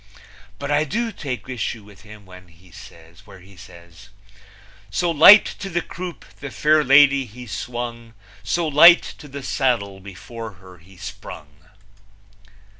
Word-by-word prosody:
But 140 +1 -5
I 145 +1 +2
do 230 - -3
take 125 - -7
issue 120 -3 -5
with 100 -2 -18
him 105 -1 -15
where 90 0 -14
he 90 0 -22
says: 85 +2 -16 1.7
So 175 - -1
light 180 +7 +8
to 195 - -6
the 175 -1 -2
croupe 180 -1 -9
the 145 - -7
fair 150 +2 +2
lady 140 0 +5
he 125 +2 -12
swung, 120 0 -7 0.3
So 170 -2 -2
light 170 +4 +7 0.2
to 150 - -12
the 140 0 -9
saddle 115 -10 -2
before 110 +4 -10
her 95 -1 -17
he 90 +3 -20
sprung! 75 -5 -11
120 Hz, 135 wpm, -21 LUFS, 95-145 Hz, 1.7 s, light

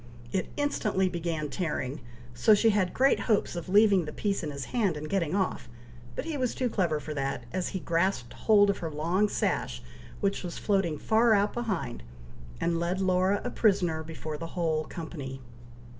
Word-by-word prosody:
It 190 - -1
instantly 215 -10 +1
began 165 -3 -2
tearing, 150 -3 -3 0.3
so 120 - +5
she 225 +2 +4
had 195 -3 +1
great 270 +2 +3
hopes 215 -5 +1
of 175 +1 -5
leaving 200 -3 +5
the 150 - -5
piece 200 +4 -1
in 155 - -3
his 140 -2 -5
hand 205 -10 +1
and 150 +1 -5
getting 175 -2 0
off; 190 -10 -1 0.5
but - - -3
he 320 -3 -3
was 255 -3 -1
too 250 -3 -1
clever 170 -8 +1
for 150 +1 -6
that, 135 -3 -2
as 185 -1 -1
he 190 - -3
grasped 165 -6 0
hold 205 -2 +4
of 200 - -6
her 165 - -3
long 170 +7 +1
sash, - - -1 0.4
which 200 -1 0
was 175 -2 -5
floating 195 -7 +1
far 220 +7 +4
out 205 +1 +2
behind, 190 - -3 0.6
and 170 -1 0
led 175 +2 -1
Laura 185 +1 +2
a 245 - -3
prisoner 180 -7 +2
before 160 -1 -6
the 165 - -5
whole 160 -2 +1
company. 145 -6 -7
180 Hz, 185 wpm, -28 LUFS, 155-205 Hz, 0.6 s, so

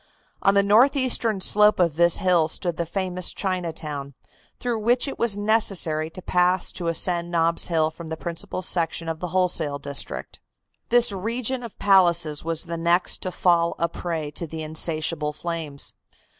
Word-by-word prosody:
On 195 0 +3
the 200 - +4
northeastern 235 -1 +2
slope 210 +2 +3
of 170 -4 +2
this 170 0 +3
hill 175 -4 +2
stood 170 +1 -2
the 170 - -3
famous 185 0 -2
Chinatown, 160 -7 -4 0.4
through 240 -2 -2
which 240 +5 +1
it 275 - -6
was 225 -4 +3
necessary 195 -7 +1
to 180 +2 -10
pass 180 +1 +1
to 175 - -5
ascend 170 +1 +1
Nob's 170 -1 +2
Hill 160 -2 +1
from 160 0 -10
the 160 - -5
principal 175 +3 -4
section 165 -1 0
of 165 -1 -4
the 180 - -4
wholesale 175 -5 0
district. 140 0 -4 0.5
This 240 -1 +5
region 235 +6 -3
of 235 -3 -9
palaces 175 -6 +3
was 165 0 -1
the 170 -1 -5
next 170 +2 +1
to 185 - -3
fall 170 -2 +1
a 170 - 0
prey 165 -3 -5
to 170 - -4
the 160 +1 -6
insatiable 155 -1 -1
flames. 160 -3 -5
175 Hz, 165 wpm, -23 LUFS, 160-195 Hz, 0.5 s, This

